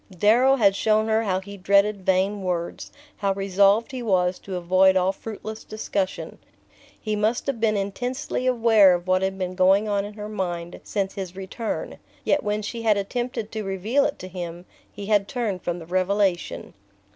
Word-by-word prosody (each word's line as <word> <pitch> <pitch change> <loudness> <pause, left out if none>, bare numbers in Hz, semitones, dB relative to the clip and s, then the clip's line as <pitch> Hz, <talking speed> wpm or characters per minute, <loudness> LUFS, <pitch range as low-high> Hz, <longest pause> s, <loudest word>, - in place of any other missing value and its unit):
Darrow 240 +8 +5
had 200 -6 +3
shown 215 +1 +2
her 220 0 +3
how 190 -4 0
he 200 +1 -10
dreaded 200 +1 +2
vain 190 +2 +2
words, 175 -2 -3 0.3
how 200 -1 0
resolved 200 +4 +3
he 260 -2 -5
was 185 -5 +1
to 190 - -7
avoid 185 +2 +4
all 185 +1 +2
fruitless 220 +2 -8
discussion. 200 -3 -4 0.6
He 215 -1 -2
must 215 +3 0
have 275 -5 -2
been 215 -2 +2
intensely 245 +6 -3
aware 225 -6 +5
of 175 0 -5
what 185 0 +2
had 190 0 -1
been 185 -1 -3
going 190 +3 +3
on 200 -1 0
in 205 +1 -7
her 210 -1 -6
mind 175 -5 -4
since 195 -2 -2
his 185 -2 -6
return, 195 +4 -5 0.2
yet 295 - +2
when 210 0 -1
she 230 +3 -5
had 220 -2 +3
attempted 230 +2 -3
to 220 - -4
reveal 200 +8 0
it 285 - -2
to 185 - -8
him 175 -1 -7 0.3
he 200 - -8
had 205 -1 +2
turned 210 -7 -3
from 175 0 -3
the 165 - -9
revelation. 185 +1 0
200 Hz, 180 wpm, -24 LUFS, 185-220 Hz, 0.6 s, Darrow